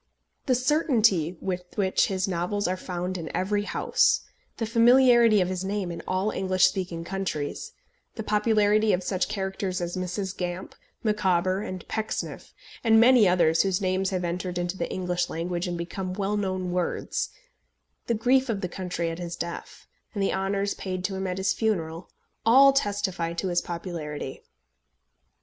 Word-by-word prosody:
The 255 - +4
certainty 230 - +2
with 180 -1 -3
which 190 -3 +2
his 190 -1 -1
novels 185 +3 -1
are 185 - 0
found 180 0 -4
in 160 - -6
every 205 +2 0
house - - +2 0.4
the 225 - -1
familiarity 235 -1 +5
of 180 - +1
his 185 0 -3
name 195 -2 -2
in 170 - -6
all 190 +3 0
English 185 -1 +2
speaking 180 -3 -1
countries 175 -5 -4 0.4
the 220 - -4
popularity 210 0 +3
of 180 - 0
such 185 0 -1
characters 190 -1 -3
as 175 0 -3
Mrs. 185 +1 -3
Gamp, 180 +1 -4 0.3
Micawber, 190 -3 +1
and 185 -3 -6
Pecksniff, 220 -1 -4 0.3
and 225 -1 +5
many 240 -2 +6
others 170 -2 +4
whose 190 -2 +1
names 190 -1 0
have 185 -2 -2
entered 175 +1 -3
into 175 +1 -2
the - - -3
English 180 -1 -1
language 175 +2 -3
and 175 -1 -3
become 185 +2 -4
well 200 +1 -1
known 185 -3 -2
words 180 -1 -2 0.8
the 235 - +1
grief 260 +4 +2
of 205 -4 -1
the 180 - -1
country 175 -2 -3
at 165 - -7
his 170 -1 -5
death, 170 0 -7 0.3
and 200 - 0
the - - +1
honours 195 +1 -1
paid 185 -1 -5
to 195 0 -2
him 190 0 -2
at 180 0 -3
his 190 +1 +1
funeral, 170 -6 -2 0.3
all 270 +5 +7
testify 200 -8 -1
to 185 +3 -2
his 175 0 +1
popularity. 165 -6 -6
190 Hz, 165 wpm, -26 LUFS, 180-210 Hz, 0.8 s, all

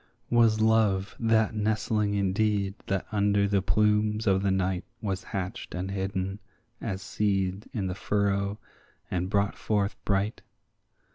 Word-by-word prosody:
Was 115 -2 +4
Love 105 -3 +2
that 110 -2 +3
nestling 105 -1 0
indeed 100 0 +1
that 95 -1 -1
under 100 -1 +2
the 100 -1 +2
plumes 105 +3 +2
of 95 -2 +3
the 100 - +1
night 95 -1 0 0.2
Was 95 -3 -3
hatched 95 -2 -5
and 95 +2 -3
hidden 95 0 -2 0.4
as 95 -4 -3
seed 100 -1 -1
in 105 -7 -2
the 90 - -2
furrow, 100 +1 0 0.5
and 90 0 -1
brought 100 0 +1
forth 105 -1 0
bright? 100 +2 0
100 Hz, 135 wpm, -28 LUFS, 95-105 Hz, 0.5 s, Was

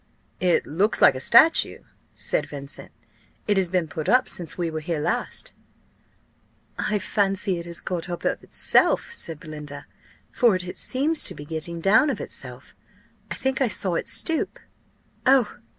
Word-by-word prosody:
"It 180 -2 +2
looks 200 +8 0
like - - +7
a 130 - -6
statue," 320 - +4 0.3
said - - 0
Vincent. 140 -1 -7 0.6
"It 205 - +3
has 185 -2 +1
been 180 -2 0
put 155 +1 -4
up 255 +1 +4
since 170 -3 -2
we 170 -2 -2
were 160 - -3
here 155 0 -3
last." - - -2 1.3
"I 210 - 0
fancy 195 -1 0
it 170 - -6
has 170 0 -2
got 180 -1 -4
up 175 - -5
of - - -1
itself," - - +2
said 165 - -2
Belinda, 150 -2 -9 0.5
"for 235 -6 +3
it 180 -1 -5
seems 295 +5 +1
to - - +4
be 145 - -9
getting 165 +2 -5
down 215 - +4
of - - -2
itself. - - -7 0.6
I - - -4
think 265 0 -2
I 265 - +4
saw 190 -4 0
it - - -2
stoop. 325 -1 0 0.7
Oh! 260 -4 +3
180 Hz, 165 wpm, -24 LUFS, 160-220 Hz, 1.3 s, like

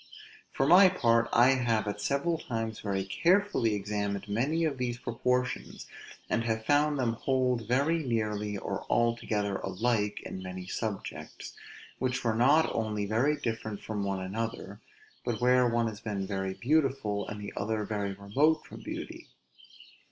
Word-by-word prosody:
For 135 - 0
my 185 +5 +8
part, 115 -9 +2
I 120 +2 +6
have 120 -5 +1
at 105 0 -3
several 140 +8 0
times 115 -5 -4
very 100 -2 -1
carefully 170 - +2
examined 100 -1 -3
many 140 +11 0
of 140 -4 -2
those 120 -1 -1
proportions, 125 +1 -2 0.4
and 115 - 0 0.2
found 145 +2 +3
them 120 -4 +1
hold 125 -2 0
very 140 +7 +2
nearly, 105 -6 -1
or - - -4
altogether 110 -4 +1
alike 105 +2 -1
in 95 - -7
many 90 0 -6
subjects, 100 +2 -5 0.5
which 125 0 -1
were 115 -2 +2
not 140 +8 +4
only 105 -2 -1
very 125 +9 +1
different 110 -5 -4
from 105 -2 -3
one 100 -1 -1
another, 105 +1 -4 0.4
but 120 -3 -2
where 125 0 +4
one 115 0 +1
has 105 -2 -5
been 105 -3 -3
very 95 -1 -3
beautiful, 135 -7 0
and 105 - -6
the 100 - -7
other 110 0 -1
very 100 -2 -2
remote 130 +12 +1
from - - -11
beauty. - - -7
115 Hz, 150 wpm, -29 LUFS, 105-130 Hz, 0.5 s, my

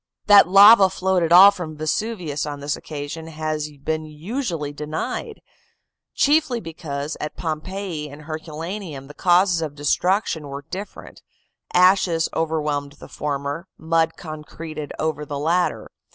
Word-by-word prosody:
That 205 -4 +8
lava 200 +1 +8
flowed 190 -1 0
at 165 -1 0
all 190 +3 +10
from 160 -5 -7
Vesuvius 160 -1 -2
on 145 -1 -5
this 145 +1 -2
occasion 150 +2 -7
has 155 -1 -3
been 155 +1 -1
usually 160 - -4
denied; 155 - -5 0.7
chiefly 290 -4 +2
because 155 -5 -5
at 150 - -5
Pompeii 165 0 -4
and 145 +2 -12
Herculaneum 160 0 -6
the 145 - -12
causes 175 +1 +3
of 150 -3 -4
destruction 160 +2 0
were 140 0 -7
different 195 +3 -8 0.5
ashes 180 -2 +4
overwhelmed 150 -3 -1
the 145 - -13
former, 145 +4 -4
mud 165 0 +1
concreted 155 -1 -8
over 155 -1 -2
the 145 -1 -5
latter. 170 +5 0
160 Hz, 130 wpm, -22 LUFS, 150-185 Hz, 0.7 s, all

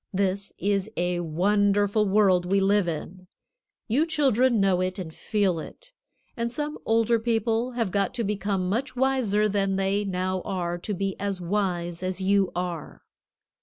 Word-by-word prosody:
This 195 0 -1
is 200 0 0
a 175 0 0
wonderful 205 +5 +2
world 190 -3 +4
we 195 - +4
live 195 -1 +3
in. 180 +3 -5 0.6
You 280 +9 +2
children 260 -6 +2
know 190 -2 +3
it 185 +1 -2
and 170 -4 -6
feel 195 -4 0
it, - - -11 0.4
and 235 0 -2
some 295 +4 -4
older 230 +1 +3
people 230 +1 0
have 230 -6 -1
got 200 +3 0
to 235 - -1
become 200 -2 -1
much 235 +10 -2
wiser 245 -6 +2
than 195 -1 0
they 195 +1 +1
now 185 -1 -2
are 175 -3 -3
to 205 +3 -3
be 195 +1 -2
as 200 -2 -2
wise 175 -2 -2
as 185 0 -3
you 195 0 +2
are. 175 -3 -5
200 Hz, 160 wpm, -26 LUFS, 185-220 Hz, 0.6 s, world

